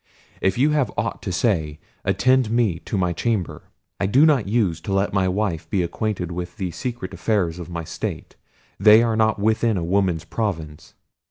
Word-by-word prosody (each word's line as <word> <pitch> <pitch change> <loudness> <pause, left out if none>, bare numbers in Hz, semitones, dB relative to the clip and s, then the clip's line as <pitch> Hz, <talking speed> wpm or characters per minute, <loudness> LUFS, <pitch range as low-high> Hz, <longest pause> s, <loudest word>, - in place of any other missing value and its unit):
If 95 +2 +1
you 145 +5 +3
have 145 -8 +1
aught - - -2
to - - -4
say 85 -7 0 0.2
attend 120 +6 +2
me 110 -8 +1
to 105 - -2
my 90 -2 +1
chamber; 105 -1 -2 0.3
I 100 - +1
do 135 +10 +5
not 140 -10 +3
use 100 -7 0
to 95 - -4
let 95 +1 +1
my 95 -2 +2
wife 90 -3 -2
be 95 -4 +1
acquainted 90 -1 -3
with 90 +3 -6
the 95 -4 -3
secret 120 -1 -5
affairs 90 -3 -1
of 85 - -8
my 85 -1 -4
state; - - -6 0.4
they 110 +3 +7
are 115 -1 +1
not 110 0 +2
within 110 +1 +1
a 85 - -2
woman's 90 -2 0
province." 85 -5 -4
100 Hz, 185 wpm, -22 LUFS, 90-110 Hz, 0.4 s, they